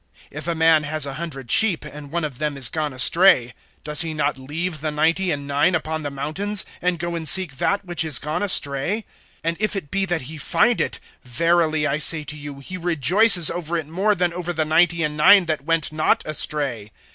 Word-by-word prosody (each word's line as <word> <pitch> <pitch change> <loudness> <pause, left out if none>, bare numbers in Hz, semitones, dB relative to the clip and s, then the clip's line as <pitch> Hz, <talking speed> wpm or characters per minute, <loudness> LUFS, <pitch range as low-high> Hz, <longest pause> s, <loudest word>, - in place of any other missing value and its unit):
If 155 +2 -7
a 170 - -2
man 160 -1 +3
has 155 0 -3
a 140 - -6
hundred 135 -5 -6
sheep, 210 -7 +4
and 145 -1 -10
one 170 0 -2
of 140 -4 -8
them 150 -2 -3
is 130 -3 +2
gone 155 -2 -3
astray, 130 -2 +4 0.3
does 150 0 +1
he 160 -2 -2
not 145 -1 -1
leave 155 +4 -5
the 155 - -2
ninety 165 +5 0
and 145 -3 -3
nine 145 +5 +1
upon 160 -1 -3
the 145 - -5
mountains, 155 +9 -1 0.2
and 180 0 0
go 170 +1 -5
and 160 -2 +1
seek 170 -4 +6
that 200 +7 -1
which 175 -2 +1
is 155 -5 +5
gone 150 +5 -3
astray? 185 +2 0 0.4
(13)And 165 +1 -2
if 215 0 0
it 155 -8 -6
be 195 0 0
that 175 -3 -2
he 155 +4 -9
find 240 - +1
it, 115 -2 -3 0.2
verily 160 +3 0
I 145 +1 -1
say 155 0 0
to 150 +1 -8
you, 145 -2 -10
he 185 +7 -8
rejoices 175 - +3
over 170 -1 -4
it 160 - -4
more 190 +7 -1
than 175 -1 0
over 175 0 -4
the 160 -1 -1
ninety 170 +1 +2
and 150 -1 -3
nine 190 +5 +5
that 155 -4 -4
went 165 -1 -1
not 155 0 0
astray. 140 -8 -2
155 Hz, 215 wpm, -21 LUFS, 145-175 Hz, 0.4 s, seek